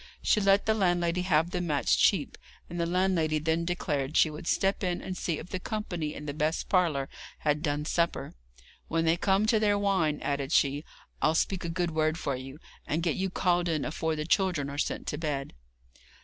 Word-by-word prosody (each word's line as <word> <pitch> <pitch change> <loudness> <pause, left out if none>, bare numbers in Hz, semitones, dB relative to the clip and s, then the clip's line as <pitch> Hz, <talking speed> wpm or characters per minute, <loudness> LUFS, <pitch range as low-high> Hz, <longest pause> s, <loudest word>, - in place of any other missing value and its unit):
She 210 - +3
let 195 0 +4
the 220 - +3
landlady 175 -3 +1
have 170 -2 +2
the 180 - -1
mats 155 -5 +2
cheap, - - +2 0.3
and 175 - -6
the 170 - +1
landlady 175 -3 +1
then 160 +2 0
declared 150 -4 -1
she 155 - +5
would 155 +3 -8
step 195 +1 +1
in 180 -1 0
and 185 - -5
see 170 -3 -2
if - - -9
the 185 - -2
company 175 -8 -4
in 150 - -7
the 145 - -3
best 155 +2 -1
parlour 160 -8 +2 0.3
had 150 0 +1
done 150 -1 -1
supper. 170 +1 -1 0.5
'When 165 0 0
they 165 +1 +4
come 195 +3 +2
to 220 0 +3
their 205 -1 +3
wine,' 185 -7 +1
added 140 0 -2
she, 145 -2 +2 0.4
'I'll 155 +1 +3
speak 185 +2 0
a 170 - -3
good 175 0 -1
word 155 0 +1
for 140 -5 -2
you, 135 +2 -8 0.3
and 160 +3 -1
get 170 -3 +1
you 190 0 -1
called 175 -1 +1
in 155 -3 0
afore 160 +1 -1
the 150 0 -3
children 170 -6 +1
are 145 - -5
sent - - -2
to 150 - -3
bed.' 145 -4 -3
165 Hz, 205 wpm, -29 LUFS, 150-180 Hz, 0.5 s, she